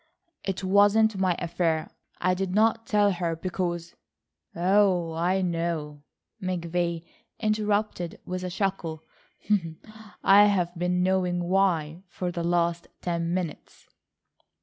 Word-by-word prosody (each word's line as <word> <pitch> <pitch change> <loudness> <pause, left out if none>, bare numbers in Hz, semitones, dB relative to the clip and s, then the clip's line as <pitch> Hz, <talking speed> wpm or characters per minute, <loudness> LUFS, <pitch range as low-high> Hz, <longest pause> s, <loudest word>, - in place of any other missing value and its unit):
"It 195 0 -3
wasn't 205 +2 +4
my 185 -2 +2
affair. 165 -2 -1 0.3
I 185 +1 +2
did 185 0 -2
not 225 +1 +2
tell 205 -1 +3
her 170 -2 -2
because—" 175 -1 -3 0.6
"Oh, 180 -2 +2
I 180 +4 +1
know," 165 -4 -2 0.4
McVay 170 -2 -2 0.3
interrupted 210 -4 -1
with 185 0 -4
a 180 - -3
chuckle. 180 -4 -2 1.2
"I've 195 -3 +5
been 180 +1 0
knowing 180 -1 +1
why 175 -3 +1
for 180 0 -4
the 170 -1 -3
last 170 0 0 0.2
ten 170 -1 -1
minutes." 175 -4 -5
180 Hz, 110 wpm, -26 LUFS, 170-195 Hz, 1.2 s, I've